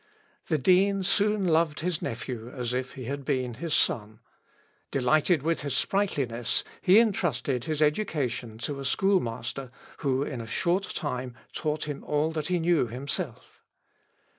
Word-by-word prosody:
The 155 - +2
dean 190 +6 +4
soon 205 +1 +2
loved 160 -2 +2
his 175 -1 -1
nephew 115 0 -4
as 125 -1 -3
if 130 +1 -3
he 130 - -6
had 140 +3 -4
been 130 -2 -1
his 155 +6 -1
son; 110 -1 +1 0.7
delighted 145 +4 +3
with 165 +1 +1
his 140 -2 -2
sprightliness, 135 - 0 0.2
he 190 +3 +6
entrusted 150 - +2
his 155 -1 +1
education 145 - -1
to 145 -2 -3
a - - -5
schoolmaster 135 - 0 0.3
who 135 -2 +1
in 130 -5 -4
a 115 - -8
short 180 - +1
time 125 -5 -3 0.2
taught 155 -1 -1
him 145 -2 -5
all 150 +2 +1
that 155 -2 -3
he 180 - +1
knew 170 -5 +2
himself. 135 - -5
145 Hz, 150 wpm, -28 LUFS, 125-170 Hz, 0.7 s, he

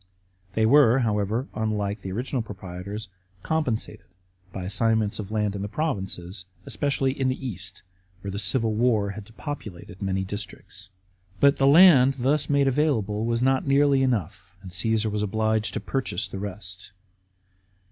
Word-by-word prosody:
They 110 - +3
were, 130 0 +6
however 110 +3 0
— - - -30
unlike 105 -2 -2
the 95 - -6
original 125 +5 -2
proprietors 100 +1 -7 0.2
— 95 0 -34
compensated 150 -9 -1 0.4
by 95 - -6
assign 110 +4 +1
ments 105 -1 -1
of 100 -2 -5
land 105 -2 -1
in 100 - -4
the 100 - -3
provinces, 95 - -3 0.2
especially 140 -2 0
in 135 -1 -1
the 130 - -1
East, 95 -3 -6 0.4
where 100 - -5
the 100 - -3
civil 110 +2 +1
war 110 -3 +2
had 105 0 -8
depopulated 105 - -8
many 95 -1 -1
districts. 100 -1 -7 0.5
But 140 0 +5
the 135 - +3
land 140 -4 +7
thus 140 +3 +1
made 140 -1 +3
available 115 -7 +1
was 115 +1 0
not 135 +1 +2
nearly 140 0 +4
enough, 95 -7 -2
and 95 - -9
Caasar 110 +4 +1
was 105 0 -1
obliged 110 +1 0
to - - 0
purchase 130 -9 -2
the 95 - -7
rest. 95 -2 -7
110 Hz, 160 wpm, -25 LUFS, 100-130 Hz, 0.5 s, land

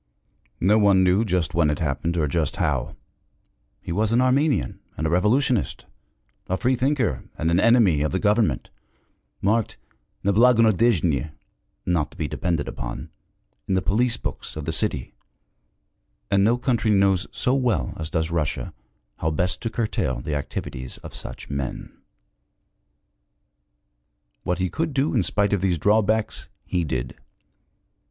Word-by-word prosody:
No 105 +5 +4
one 100 -2 +5
knew 95 +4 +3
just 90 -6 -1
when 85 -3 +3
it 75 - 0
happened, 80 +2 -1
or 75 -3 +1
just 75 -1 -1
how: - - -1 0.8
he - - -7
was 105 +5 +1
an 115 - +3
Armenian 130 0 +1 0.2
and 80 - -2
a 80 - 0
revolutionist, 110 +6 +1 0.6
a 95 - 0
freethinker 130 - 0
and 80 +1 0
an 85 - +3
enemy 110 -9 +4
of 75 - 0
the 95 - 0
government, 105 - +1 0.7
marked 110 +2 +1 0.5
'neblagonadejny' 110 - +3 0.6
(not 85 -4 +1
to - - -18
be - - -2
depended 85 -5 -2
upon) - - -6 0.6
in 95 - +1
the 95 - +2
police 115 +5 +1
books - - -5
of 75 -2 -5
the 80 - -1
city 80 - -1 1.2
and 100 -1 +4
no 115 +4 +3
country 120 -3 0
knows 95 -2 +3
so 125 - 0
well 125 -4 0
as 80 -1 -4
does 80 -2 -1
Russia 80 -4 -2 0.4
how 80 - -1
best 90 +4 -1
to 115 - -2
curtail 105 - -1
the 75 +5 -4
activities 65 -3 -4
of - - -9
such - - -8
men. 70 -2 -5 2.5
What 90 - -1
he 95 0 0
could 160 - -3
do 140 +2 +1
in 120 - +3
spite 100 +3 +1
of 100 - +1
these 90 -3 +1
drawbacks, 105 +4 +1 0.2
he 90 -2 -1
did. 65 -5 -3
95 Hz, 145 wpm, -24 LUFS, 80-115 Hz, 2.5 s, one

